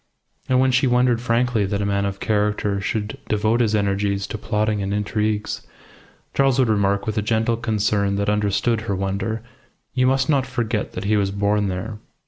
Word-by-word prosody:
And 130 0 +4
when 130 0 +3
she 130 +2 +3
wondered 125 -1 +3
frankly 120 -2 +1
that 100 0 -1
a 100 - -1
man 100 0 0
of 100 0 -5
character 105 -1 0
should 105 +2 -3
devote 110 +2 +2
his 110 -2 +2
energies 100 -1 0
to - - -5
plotting 105 -1 0
and 100 0 -2
intrigues, 105 0 -1 0.7
Charles 135 -2 +3
would 130 -3 +3
remark, 100 -2 +1
with 110 0 -1
a - - 0
gentle 110 +2 +1
concern 105 -3 0
that 100 0 -1
understood 105 +2 +1
her 105 -3 -2
wonder, 100 +4 -2 0.5
"You 130 -1 +2
must 130 0 +2
not 140 -4 +2
forget 115 -3 -2
that 90 - -5
he 105 +2 +2
was 100 -1 +1
born 100 +1 +1
there." 95 +4 -4
105 Hz, 185 wpm, -22 LUFS, 100-115 Hz, 0.7 s, And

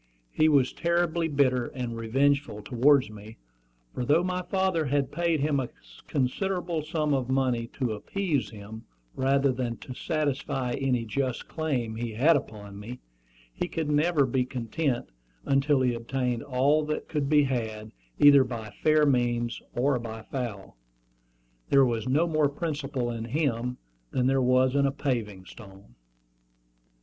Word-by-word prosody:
He 155 0 +3
was 140 -4 +3
terribly 170 -1 0
bitter 130 -5 +2
and 125 -3 -5
revengeful 135 0 0
towards 130 0 +3
me; 105 +1 -11 0.6
for 125 - -3
though 150 +7 +3
my 180 0 -1
father 185 -3 0
had 140 -1 0
paid 170 -2 0
him 145 -1 +1
a 125 - -3 0.4
considerable 175 +5 -1
sum 155 -1 -1
of 130 -2 -1
money 130 -3 +1
to 125 -4 -2
appease 155 - -2
him, 110 +1 -10 0.3
rather 135 +1 +2
than 125 -2 -3
to 130 - -9
satisfy 135 -4 -2
any 125 -3 0
just 130 +2 -2
claim 125 -9 -2
he 115 -1 -4
had 145 +9 +4
upon 105 -6 -5
me, 120 +5 -8 0.5
he - - -3
could 155 -2 -2
never 150 0 +3
be 130 0 +1
content 125 +2 -2 0.4
until 140 0 +2
he 125 -1 +2
obtained 120 0 -2
all 140 +4 +2
that 150 0 -3
could 145 -3 -2
be 150 -1 +5
had, 110 -5 -3 0.3
either 140 -2 +7
by 115 -4 -6
fair 155 -1 +4
means 120 -3 0
or 130 +1 +2
by 110 -1 -7
foul. 115 - -6 0.9
There 135 -1 +6
was 115 -1 -2
no 150 +6 +3
more 155 -3 +2
principle 140 -5 -3
in 115 -1 -5
him 125 -2 -1 0.3
than 125 - 0
there 135 +1 +3
was 130 +1 +3
in 140 0 +3
a - - 0
paving 115 -9 -3
stone. 95 - -14
130 Hz, 150 wpm, -27 LUFS, 120-150 Hz, 0.9 s, either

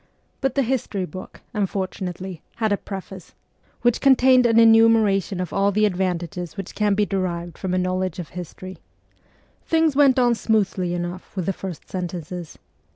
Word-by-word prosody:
But 270 -1 0
the 275 - +3
history 225 -6 -2
book, 185 +3 -10
unfortunately, 190 -3 -3 0.2
hacl 220 -2 +1
a 205 - +2
preface, 190 -2 -9 0.5
which 240 -1 +2
contained 255 -2 +5
an 230 -1 +4
enumeration 225 -4 +4
of 180 -2 -4
all 200 +1 +2
the 215 +2 +3
advantages 180 -2 -2
which 195 -2 -6
can 210 -2 +1
be 210 +1 +2
derived 175 -4 -3
from 185 -1 -3
a - - +1
knowledge 185 -1 -1
of 175 -4 -6
history. 180 +1 -8 0.8
Things 320 -3 +2
went 275 -2 +5
on 245 -2 +4
smoothly 200 -6 0
enough 175 +2 -6
with 185 -3 -2
the 195 - 0
first 185 -3 -8
sentences. 175 -2 -6
195 Hz, 155 wpm, -23 LUFS, 180-225 Hz, 0.8 s, contained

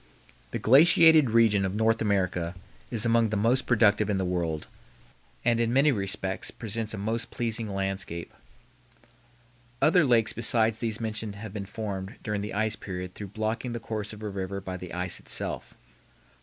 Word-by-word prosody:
The - - -3
glaciated 160 +2 +6
region 110 -3 +4
of 95 +1 -2
North 110 +1 +2
America 95 -4 0 0.3
is 115 -2 +1
among 115 -1 +3
the 105 - -1
most 120 +6 +2
productive 105 -3 +3
in 100 - +1
the 95 - -1
world, 85 -4 -2 0.8
and 120 -1 +3
in 115 0 +1
many 140 +4 +4
respects 95 -3 -2
presents 110 -1 -4
a - - -8
most 110 +3 -2
pleasing 115 -1 -2
landscape. 95 -4 -4 1.5
Other 175 +2 +4
lakes 120 -5 +3
besides 115 -1 +3
these 115 -2 -2
mentioned 110 -2 -4
have 105 -1 -8
been 100 -2 -5
formed 100 -2 -5
during 105 -1 -2
the 105 0 -5
ice 110 0 0
period 90 -3 -6
through 105 - -7
blocking 110 +3 -2
the 120 - -4
course 110 -2 -5
of 110 0 -10
a 105 - -3
river 95 0 -4
by 95 -1 -6
the 90 -1 -8
ice 90 0 -3
itself. - - -4
Dr. - - -24
110 Hz, 170 wpm, -27 LUFS, 95-115 Hz, 1.5 s, glaciated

